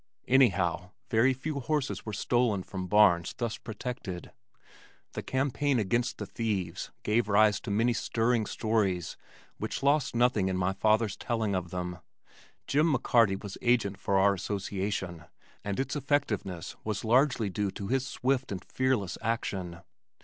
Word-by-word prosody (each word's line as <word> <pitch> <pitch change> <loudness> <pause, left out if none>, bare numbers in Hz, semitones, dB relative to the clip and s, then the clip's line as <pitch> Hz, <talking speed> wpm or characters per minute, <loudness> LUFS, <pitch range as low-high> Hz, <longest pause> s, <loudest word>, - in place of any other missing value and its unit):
Anyhow 90 -8 +3 0.2
very 115 +3 +4
few 140 +3 -3
horses 140 -2 -2
were - - -2
stolen 110 -2 +1
from 95 -1 -5
barns 100 -4 +4
thus 115 -2 -2
protected. 110 -5 -6 0.8
The - - -4
campaign 135 +1 0
against 120 +3 0
the - - -4
thieves 100 -7 -3
gave 105 0 +1
rise 105 +1 +4
to - - -7
many 115 +4 +2
stirring 115 0 0
stories 100 -6 0 0.4
which - - -4
lost 140 -2 +2
nothing 120 -5 +3
in 95 -1 -1
my 95 +1 +1
father's 110 0 +2
telling 110 -3 -1
of 90 -2 -2
them. 90 -1 -4 0.7
Jim 155 +3 +2
McCarty 115 -7 +3
was 100 -2 -7
agent 110 -5 +2
for 100 -1 +1
our 100 +1 +5
association 95 -3 -3 0.4
and 100 +1 -3
its 135 - -1
effectiveness 120 - -1
was 110 0 -3
largely 120 -3 +3
due 100 +2 -1
to 100 +1 -6
his 130 0 +1
swift 130 -1 -1
and 95 -3 -5
fearless 130 -8 -1
action. 95 -6 -3
110 Hz, 145 wpm, -29 LUFS, 95-125 Hz, 0.8 s, our